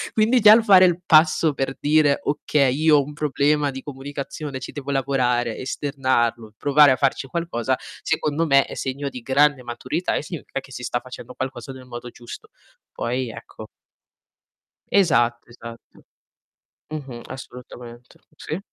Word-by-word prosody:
quindi 225 +3 +3
già 210 0 +9
il 230 - +3
fare 190 -3 +7
il 175 -1 +1
passo 155 -2 +4
per 135 0 -3
dire: 150 -1 +3
"Okay, 140 -2 +1
io 155 +1 +4
ho 140 - +2
un 150 - -9
problema 150 0 +1
di 135 -1 -7
comunicazione, 140 0 -6
ci - - -8
devo 145 -1 -8
lavorare, 125 -4 0
esternarlo, 130 -5 -1
provare 145 0 +5
a 130 - +3
farci 135 0 -1
qualcosa", 150 -6 -2 0.2
secondo 155 +2 -1
me, 140 -2 +4
è - - -9
segno 140 +1 -4
di 125 - -9
grande 140 +2 +2
maturità 125 +8 -3
e - - -2
significa 150 -3 -6
che 135 - -15
si 125 - -8
sta 120 - -2
facendo 130 +1 -11
qualcosa 130 -1 -5
nel 130 -1 -11
modo 120 0 -8
giusto. 120 0 -11 0.4
Poi, 125 +1 -3
ecco - - -11 1.2
Esatto, 120 -11 +2
esatto. 115 -1 -13 0.9
Mh-mh, 135 -6 -7
assolutamente. 125 -2 -11 0.2
Sì. 155 +3 -5
135 Hz, 150 wpm, -22 LUFS, 125-150 Hz, 1.2 s, già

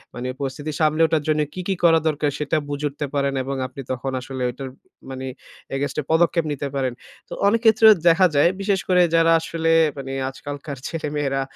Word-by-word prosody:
মানে 125 +1 -4
পরিস্থিতি 140 +3 -4
সামলে 155 +1 +2
ওঠার 160 -2 0
জন্য 155 -1 +2
কি, 185 - -5
কি 195 - 0
করা 165 -1 +6
দরকার 150 -1 0
সেটা 150 +1 0
বুঝে 145 +1 -3
উঠতে 145 +1 -5
পারেন। 140 -1 0
এবং 135 +1 -4
আপনি 130 +2 -9
তখন 130 +1 -3
আসলে 130 +1 -7
ওইটার 135 +2 -7 0.4
মানে 130 0 -6 0.5
against 140 0 -3
এ - - -10
পদক্ষেপ 170 0 +2
নিতে 145 0 -3
পারেন। 130 -2 -1 0.4
তো - - -7
অনেক 225 +2 +2
ক্ষেত্রেও 220 0 +7 0.2
দেখা 180 +3 +5
যায় 145 +4 +5
বিশেষ 195 -1 +1
করে 180 -1 +4
যারা 165 0 +4
আসলে 165 0 -1 0.3
মানে 135 -1 -6 0.2
আজকালকার 140 +1 -7
ছেলেমেয়েরা, 145 -4 -2
145 Hz, 185 wpm, -22 LUFS, 135-165 Hz, 0.5 s, ক্ষেত্রেও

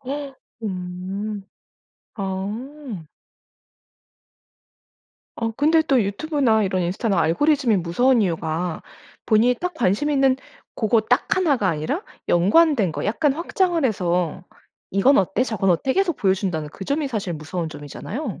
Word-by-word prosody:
어 275 +1 -5 1.8
아. 210 - -5 2.3
어 230 -1 -1
근데 315 +6 +3
또 270 -7 +3
유튜브나 225 +1 +1
이런 185 -1 0
인스타나 190 +2 0
알고리즘이 265 - +2
무서운 225 +9 +2
이유가 165 -2 -2 0.4
본인이 230 +3 +4
딱 360 +6 -4
관심있는 270 +5 +2 0.4
고거 220 0 +2
딱 - - +1
1 325 -7 +3
가 200 -5 0
아니라 165 - -2 0.3
연관된 210 - +4
거 - - -4
약간 270 +7 +1
확장을 340 +1 0
해서 180 - 0 0.5
"이건 225 +9 +4
어때? 195 +5 +1
저건 195 -6 0
어때?" 220 +10 +1
계속 375 -6 +1
보여준다는 190 -6 0
그 190 - -8
점이 285 +4 -1
사실 200 -7 -3
무서운 160 +2 -4
점이잖아요. 185 - -6
220 Hz, 265 characters per minute, -22 LUFS, 180-280 Hz, 2.3 s, 본인이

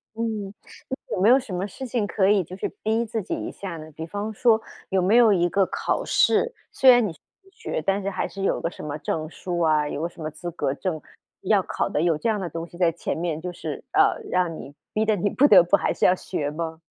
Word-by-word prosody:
嗯， 215 -3 -3 0.6
那 - - -2
有 185 - -2
没 210 - +5
有 260 +2 +7
什 235 -8 -8
么 185 +3 -2
事 265 +7 -8
情 230 -3 0
可 195 -1 +1
以 205 -2 +4
就 180 +3 -9
是 - - -2
逼 225 +2 +1
自 225 0 -3
己 185 - -5
一 - - -5
下 185 -4 -7
呢？ 155 0 -10
比 160 +2 -7
方 205 +5 -4
说 225 +1 +3 0.3
有 190 -1 +2
没 195 +6 +3
有 230 -3 +7
一 175 -2 +2
个 195 +1 +2
考 - - -1
试， 475 0 +3 0.2
虽 265 - +5
然 245 -2 +7
你 175 - -5
是 155 - -23 0.2
自 385 - -23
学， 160 - -4
但 195 +5 0
是 195 - -2
还 195 - -2
是 195 - -7
有 - - +1
个 165 - -1
什 - - -11
么 150 0 -4
证 155 +1 -3
书 175 0 -4
啊， 155 -3 +2
有 145 - -4
个 170 - -1
什 175 - -14
么 155 - -3
资 175 +3 -7
格 135 -5 -1
证 160 -1 -3 0.4
要 - - +3
考 - - -2
的， 150 - 0
有 165 -3 +2
这 230 - -1
样 215 - 0
的 180 -3 -4
东 165 +2 -5
西 170 - -14
在 175 -2 +3
前 170 - -4
面， 165 -2 -2
就 180 0 -4
是， - - -6
呃， - - +3
让 180 -3 0
你 145 - -10 0.2
逼 215 +1 +1
得 215 -1 +2
你 205 +1 0
不 285 +8 +4
得 185 -7 +8
不 175 - +4
还 - - 0
是 - - +1
要 180 - +5
学 145 -5 -3
吗？ 160 0 -5
185 Hz, 285 characters per minute, -24 LUFS, 165-215 Hz, 0.6 s, 得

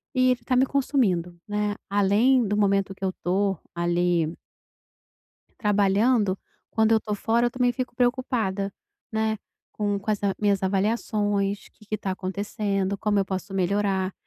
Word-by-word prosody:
e 255 0 +4
ele 250 - 0
está 255 - 0
me 255 +1 +5
consumindo, 210 - 0
né, 210 0 -1
além 210 +5 +3
do 205 - 0
momento 195 -1 +1
que 190 - -11
eu 190 - +1
tô 195 +1 +1 0.2
ali 170 -1 +1 1.3
trabalhando 205 0 +2 0.3
quando 220 0 +3
eu 220 - +4
tô 210 -1 -3
fora 230 +3 +1
eu - - 0
também 245 0 +1
fico 250 0 -4
preocupada, 245 -6 0 0.4
né, 220 -1 0 0.3
com 205 -1 -1
com 200 +2 -3
essa 200 -2 0
minhas 200 -2 +1
avaliações 205 0 0
que 210 - -21
que 215 - -2
tá 195 -2 -4
acontecendo, 195 +1 -2
como 210 0 +1
eu 195 - +2
posso 190 +1 -5
melhorar, 195 0 +1
205 Hz, 150 wpm, -25 LUFS, 195-220 Hz, 1.3 s, me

